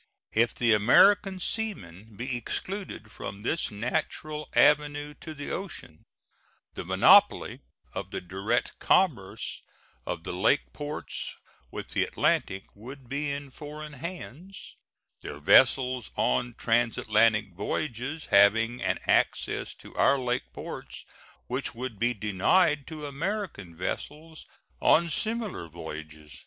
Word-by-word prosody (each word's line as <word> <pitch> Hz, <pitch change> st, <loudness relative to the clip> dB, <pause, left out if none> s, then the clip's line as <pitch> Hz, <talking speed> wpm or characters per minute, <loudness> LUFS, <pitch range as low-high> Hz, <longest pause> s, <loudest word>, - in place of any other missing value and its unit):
If 115 Hz, +1 st, +2 dB
the 120 Hz, -2 st, +3 dB
American 190 Hz, -, +5 dB
seamen 110 Hz, -, -5 dB
be 125 Hz, +2 st, -3 dB
excluded 120 Hz, -, -5 dB
from 100 Hz, -2 st, -7 dB
this 160 Hz, +8 st, 0 dB
natural 150 Hz, +7 st, -3 dB
avenue 145 Hz, 0 st, +3 dB
to 155 Hz, -1 st, -8 dB
the 145 Hz, 0 st, -6 dB
ocean, 170 Hz, -, -7 dB, 0.7 s
the -, -, -5 dB
monopoly -, -, +5 dB, 0.3 s
of -, -, -5 dB
the -, -, -4 dB
direct 95 Hz, +7 st, -2 dB
commerce 125 Hz, -, +1 dB, 0.5 s
of 80 Hz, -2 st, -4 dB
the -, -, -4 dB
lake 95 Hz, +10 st, +1 dB
ports 150 Hz, +1 st, -5 dB, 0.3 s
with -, -, -7 dB
the -, -, +1 dB
Atlantic 95 Hz, 0 st, 0 dB
would 125 Hz, +4 st, -11 dB
be 145 Hz, +2 st, -2 dB
in 140 Hz, -1 st, -5 dB
foreign 150 Hz, +1 st, -8 dB
hands, 170 Hz, +4 st, -8 dB, 0.5 s
their 75 Hz, -, -7 dB
vessels 125 Hz, -, +4 dB
on 115 Hz, -, 0 dB
transatlantic 110 Hz, -3 st, +2 dB
voyages 125 Hz, -, -3 dB
having 115 Hz, +4 st, +5 dB
an -, -, 0 dB
access -, -, +1 dB
to -, -, -14 dB
our 140 Hz, -, +4 dB
lake 125 Hz, -1 st, -2 dB
ports -, -, -8 dB, 0.4 s
which 130 Hz, 0 st, -3 dB
would 120 Hz, -3 st, -5 dB
be 120 Hz, +2 st, +1 dB
denied 135 Hz, -, +2 dB
to 155 Hz, -2 st, -7 dB
American 145 Hz, -, -4 dB
vessels 155 Hz, -, -5 dB, 0.3 s
on 170 Hz, +1 st, +4 dB
similar 215 Hz, -, -1 dB
voyages. 75 Hz, -3 st, -9 dB
125 Hz, 120 wpm, -28 LUFS, 105-155 Hz, 0.7 s, American